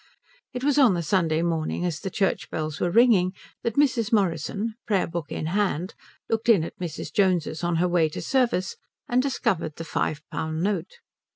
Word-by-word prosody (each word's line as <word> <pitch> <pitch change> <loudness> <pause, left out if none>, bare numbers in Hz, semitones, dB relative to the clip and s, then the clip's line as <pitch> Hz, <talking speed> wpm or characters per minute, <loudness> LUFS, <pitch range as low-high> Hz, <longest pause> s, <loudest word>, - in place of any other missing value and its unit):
It 250 +1 -5
was 290 0 +3
on 245 -9 +6
the 170 - -2
Sunday 165 -2 +1
morning 165 +1 -1
as 170 -3 -2
the 190 - -4
church 195 0 -1
bells 155 -1 -4
were 175 - +1
ringing, 190 -3 +4 0.3
that 230 - -2
Mrs. 255 -6 +2
Morrison, 200 +2 0
prayer 200 -5 +2
book 165 -3 -5
in - - -3
hand, 185 0 -1 0.3
looked 225 +1 -1
in 200 -8 +6
at - - -8
Mrs. 175 -4 -5
Jones's 180 -5 +1
on 175 0 +1
her 175 +2 +2
way 170 -3 +2
to - - -6
service 240 -8 0 0.3
and 245 +1 +3
discovered 230 - -1
the 165 - -6
five 155 -2 -2
pound 160 +1 -2
note. 200 - -2
185 Hz, 185 wpm, -25 LUFS, 165-225 Hz, 0.3 s, on